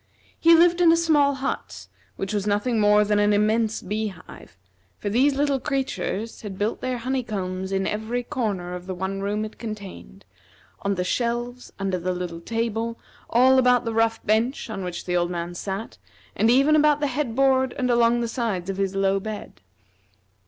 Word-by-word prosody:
He 335 0 +7
lived 345 +1 +4
in 335 -2 +7
a 330 - +4
small 295 -4 +3
hut, 270 0 -4 0.3
which 195 +2 -4
was 205 -1 -1
nothing 215 +3 +1
more 210 0 +5
than 205 0 +2
an 205 0 +3
immense 215 +1 +1
bee 215 +3 -2
hive, 195 - -12 0.4
for 205 - -4
these 270 +5 +3
little 280 -1 +1
creatures 260 -6 -3
had 200 -3 -7
built 210 +3 -2
their 255 -1 -2
honeycombs 210 -7 -3
in 195 0 0
every 220 +3 -2
corner 205 -10 -3
of 180 0 -7
the 185 - -4
one 190 +2 -3
room 210 +2 -1
it 215 - -11
contained, 205 - -8 0.6
on 200 0 0
the 180 - -1
shelves, 240 +4 -2
under 195 -2 -1
the 180 +2 -2
little 175 -2 -5
table, 230 +2 -2 0.3
all 260 +2 +5
about 250 -1 +3
the 230 - -2
rough 225 0 +1
bench 225 +3 0
on 195 -3 -4
which 180 -1 -5
the 180 - -1
old 175 0 +1
man 175 0 -4
sat, 195 +5 -5 0.4
and 225 - +3
even 275 +5 +5
about 300 -1 +4
the 295 - 0
head 270 -3 -2
board 265 -1 +2
and 250 -2 +1
along 235 0 +3
the 235 - -1
sides 215 -6 -2
of 190 - -7
his 195 -1 -1
low 195 0 +2
bed. 210 - -7
220 Hz, 190 wpm, -24 LUFS, 195-250 Hz, 0.6 s, He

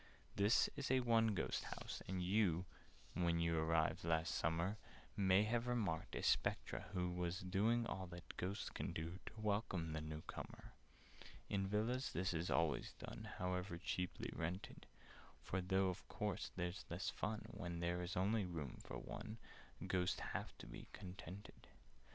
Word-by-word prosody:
"This 100 +4 +5
is 140 - -2
a 130 0 +5
'one 115 -3 +4
ghost' - - 0
house, - - -5
and 95 -1 -1
you 90 -2 +3 0.5
When 85 -1 +3
you 85 0 +3
arrived 80 0 +3
last 80 0 +2
summer, 85 +6 +1 0.4
May 95 0 +6
have 115 +2 +1
remarked 105 -10 0
a - - -2
Spectre - - +2
who 90 -1 +1
Was 90 +1 -1
doing 110 +6 +3
all 95 -4 -3
that 85 0 -8
Ghosts 95 +3 -2
can - - -2
do 85 +3 -3
To 110 - -7
welcome 100 -6 +1
the 80 - -1
new 80 0 -4
comer. - - -7 0.8
"In 95 -1 +2
Villas 115 +6 +1
this 95 +1 +1
is 85 +2 0
always 85 -3 +2
done— - - -7
However 90 0 -1
cheaply 90 0 -2
rented: 85 +4 -3 0.6
For, 95 - 0
though 95 +1 +3
of 90 +1 -5
course 105 -4 -1
there's 90 +1 -2
less 85 +3 -1
of - - -18
fun 105 0 -1
When 85 -2 -4
there 85 +1 +1
is 90 +2 -2
only 100 +3 +3
room 80 -8 -4
for - - -5
one, 110 - -5 0.5
Ghosts 90 -1 +2
have - - -3
to - - -8
be - - -8
contented. 95 +2 -8
90 Hz, 165 wpm, -42 LUFS, 85-105 Hz, 0.8 s, May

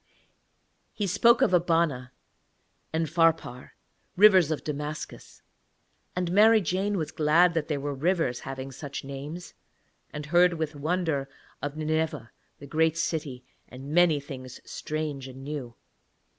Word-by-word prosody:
He 210 -2 -2
spoke 235 +5 +4
of - - +2
Abana 165 -7 +1 0.8
and 160 0 0
Pharpar, 165 -6 0 0.4
rivers 190 -5 +7
of 155 - -2
Damascus: 150 +1 -6 0.7
and 180 -1 -1
Mary 220 +4 +6
Jane 195 +1 -1
was 160 -4 -3
glad 165 +3 +4
that 165 -2 -1
there 150 -3 -1
were 145 +1 -3
rivers 160 -3 0
having 135 0 -7
such 140 +1 -7
names, 140 +6 -7 0.6
and 150 0 -6
heard 175 +3 +4
with 160 -1 -3
wonder 155 -2 -1 0.3
of 145 +1 -4
Nineveh, 155 -6 -2 0.3
that 140 - -11
great 160 +3 +1
city, 145 -7 -3 0.2
and 135 +3 -8
many 170 -3 +4
things 130 -3 -9
strange 150 -3 -4
and 130 +1 -10
new. 135 -5 -6
155 Hz, 130 wpm, -27 LUFS, 140-175 Hz, 0.8 s, rivers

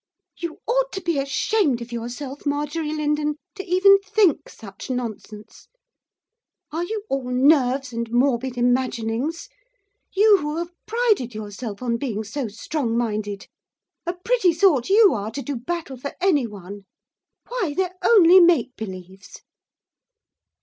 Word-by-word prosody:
'You 340 -2 -6
ought - - +1
to 385 - -4
be 340 -5 0
ashamed 280 - +1
of 235 0 -9
yourself, 245 +4 -6
Marjorie 295 +2 -2
Lindon, 300 -1 -1 0.2
to 385 - -7
even 390 +2 +5
think 400 -5 +2
such 195 +1 -11
nonsense. 220 -3 -6 1.0
Are 325 +3 -2
you 425 +3 -4
all 270 -2 -2
nerves 265 0 +3
and 230 0 -4
morbid 250 0 +1
imaginings, 245 - -1 0.6
you 415 +1 +5
who 300 -2 -4
have 340 +1 -4 0.2
prided 430 - +1
yourself 215 +1 -6
on 235 -1 0
being 225 -5 -3
so 240 +4 -4
strong 230 +2 -3
minded! 210 -3 -2 0.6
A 345 - 0
pretty 365 0 +1
sort 325 -7 +3
you 410 -1 +6
are 210 -1 -3
to 270 +5 -6
do 285 - -4
battle 270 +2 -5
for 280 +3 -7
anyone. 210 - -1 0.6
Why, 440 -12 -2
they're 370 -1 0
only 375 -5 +7
make 340 -7 +4
believes! 190 -1 -9
280 Hz, 135 wpm, -23 LUFS, 235-350 Hz, 1.0 s, only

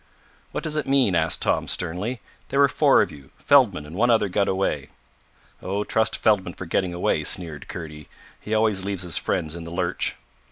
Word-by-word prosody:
"What - - -4
does 155 -1 -2
it 150 - -1
mean?" 135 -7 +3
asked 85 0 +1
Tom - - +1
sternly. 90 +8 -2 0.3
"There 135 - 0
were 140 - +7
four 130 - +4
of - - -6
you. 70 -2 -13
Feldman 115 - +3
and 75 +3 -10
one 120 +5 +2
other 110 -4 +3
got 100 +2 +1
away." 95 -8 -1 0.7
"Oh, 100 +2 -2
trust 110 +1 +1
Feldman 95 -5 +1
for 95 - -7
getting 90 +2 0
away," 90 - 0
sneered 80 -5 -2
Kurdy. 75 -3 -8 0.3
"He 110 - -3
always 110 -3 +2
leaves 95 -2 -2
his 85 -3 -1
friends 80 +1 -2
in 85 - -7
the 85 - -8
lurch." 90 +1 -2
95 Hz, 195 wpm, -24 LUFS, 85-110 Hz, 0.7 s, were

